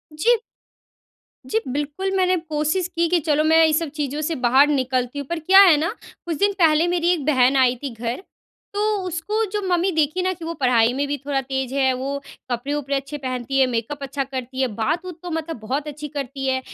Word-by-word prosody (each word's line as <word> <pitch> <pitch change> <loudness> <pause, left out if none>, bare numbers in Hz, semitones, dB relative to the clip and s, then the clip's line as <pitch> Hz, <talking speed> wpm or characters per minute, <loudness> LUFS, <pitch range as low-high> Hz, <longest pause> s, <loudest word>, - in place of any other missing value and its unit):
जी। 465 +10 +3 1.1
जी, 445 - +1
बिल्कुल 295 +8 -3
मैंने 370 -1 +3
कोशिश 315 +2 -1
की, 340 -1 0
कि 355 0 +3
चलो 305 -1 +1
मैं 320 +1 +4
ये 315 - +2
सब 320 0 0
चीज़ों 295 0 -2
से 320 +2 -1
बाहर 260 +2 +4
निकलती 260 -2 -1
हूँ, 280 - -6
पर 340 +1 -3
क्या 375 +5 +6
है 355 -6 +7
ना, 320 +3 0 0.4
कुछ 335 -3 -3
दिन 405 +3 +2
पहले 320 0 +4
मेरी 345 -1 +1
1 325 -6 -1
बहन 265 -3 +3
आई 255 -1 +4
थी 280 - -2
घर, 235 - -4 0.5
तो 405 - -3 0.3
उसको 385 +6 -1
जो 420 0 -1
मम्मी 360 +1 +2
देखी 315 +2 +1
ना 370 +1 0
कि 340 -2 -9
वो 335 - -3
पढ़ाई 245 -5 +3
में 280 +2 -1
भी 290 +1 -2
थोड़ा 280 -2 0
तेज़ 265 -1 -3
है, 265 -1 +3
वो 270 +2 -3 0.3
कपड़े-वपड़े 280 +3 -2
अच्छे 275 +2 -4
पहनती 260 -1 -2
है, 265 - +5
मेकअप 250 +4 -3
अच्छा 275 0 -2
करती 260 -1 -5
है, 260 - +2
बात-वूत 325 - -2
तो 355 - -5
मतलब 325 -3 -4
बहुत 265 +7 -3
अच्छी 300 0 -6
करती 275 -1 -5
है। 260 0 +1
290 Hz, 210 wpm, -22 LUFS, 265-335 Hz, 1.1 s, है